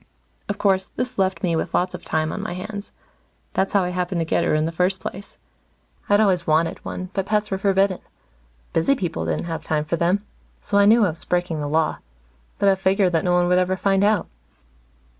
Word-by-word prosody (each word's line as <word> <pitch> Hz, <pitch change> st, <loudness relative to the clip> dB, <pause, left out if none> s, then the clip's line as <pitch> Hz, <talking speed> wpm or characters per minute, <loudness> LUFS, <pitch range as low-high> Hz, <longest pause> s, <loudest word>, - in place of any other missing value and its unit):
Of 205 Hz, -, -2 dB
course, 190 Hz, -2 st, +2 dB
this 250 Hz, -2 st, -5 dB
left 190 Hz, +1 st, 0 dB
me 170 Hz, -2 st, +1 dB
with 160 Hz, -, -2 dB
lots 180 Hz, +1 st, +1 dB
of 180 Hz, -, -8 dB
time 155 Hz, 0 st, -1 dB
on 205 Hz, -, -4 dB
my 205 Hz, -3 st, -4 dB
hands. 200 Hz, +3 st, -7 dB, 0.6 s
That's 195 Hz, -, 0 dB
how 200 Hz, -2 st, +4 dB
I 180 Hz, -, -1 dB
happened 180 Hz, 0 st, -2 dB
to -, -, -1 dB
get -, -, +1 dB
her -, -, +2 dB
in 155 Hz, 0 st, +1 dB
the 165 Hz, -, -2 dB
first 180 Hz, +3 st, +1 dB
place. 195 Hz, +2 st, -8 dB, 0.7 s
I'd 205 Hz, 0 st, +5 dB
always 185 Hz, -5 st, +2 dB
wanted 160 Hz, +1 st, +1 dB
one, 185 Hz, 0 st, -6 dB
but 195 Hz, -1 st, -2 dB
pets 210 Hz, -1 st, 0 dB
were 190 Hz, -, -1 dB
forbidden. 195 Hz, -1 st, +2 dB, 0.7 s
Busy 220 Hz, +13 st, +3 dB
people 170 Hz, -, -3 dB
didn't 80 Hz, -2 st, -1 dB
have 165 Hz, -2 st, -4 dB
time 155 Hz, -1 st, -1 dB
for 170 Hz, +2 st, -1 dB
them. 185 Hz, +5 st, +1 dB, 0.3 s
So 200 Hz, -, +1 dB
I 200 Hz, -, +6 dB
knew 220 Hz, +1 st, +6 dB
I 180 Hz, -, +1 dB
was 160 Hz, -, -6 dB
breaking 175 Hz, -3 st, -1 dB
the 145 Hz, -, -3 dB
Law. 155 Hz, +2 st, 0 dB, 0.6 s
But 200 Hz, -, +3 dB
I -, -, +5 dB
figured 190 Hz, 0 st, +2 dB
that 165 Hz, -2 st, +1 dB
no 180 Hz, -, +2 dB
one 175 Hz, 0 st, +3 dB
would 180 Hz, +1 st, +4 dB
ever 185 Hz, +1 st, 0 dB
find 195 Hz, 0 st, +2 dB
out. 205 Hz, -3 st, +2 dB
185 Hz, 220 wpm, -22 LUFS, 170-200 Hz, 0.7 s, I